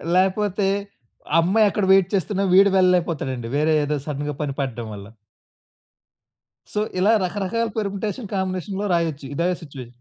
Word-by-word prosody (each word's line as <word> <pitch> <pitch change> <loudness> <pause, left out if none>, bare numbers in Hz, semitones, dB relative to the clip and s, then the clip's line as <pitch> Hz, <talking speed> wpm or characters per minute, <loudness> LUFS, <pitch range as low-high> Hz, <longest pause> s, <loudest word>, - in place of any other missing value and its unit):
లేకపోతే, 195 +1 +1 0.7
అమ్మాయి 200 +6 +4
అక్కడ 200 0 -1
వైట్ 190 -2 +5
చేస్తున్నా 195 +1 -1
వీడు 200 +1 +6
వెళ్ళలేకపోతాడండి. 170 -9 +1
వేరే 155 +2 +2
ఏదో 150 +1 -1
సడెన్‌గా 145 0 -3
పని 145 -2 -2
పడడం 120 -4 -4
వల్ల. 100 -1 -9 1.7
సో, 210 - 0 0.2
ఇలా 200 +4 +4
రకరకాల 205 +5 -2
పెర్ముటేషన్ 210 +2 -3
కాంబినేషన్‌లో 190 +1 -2
రాయొచ్చు 160 -4 -1
ఇదే 170 +4 +1
సిట్యుయే 140 -6 -9
185 Hz, 125 wpm, -22 LUFS, 150-200 Hz, 1.7 s, వీడు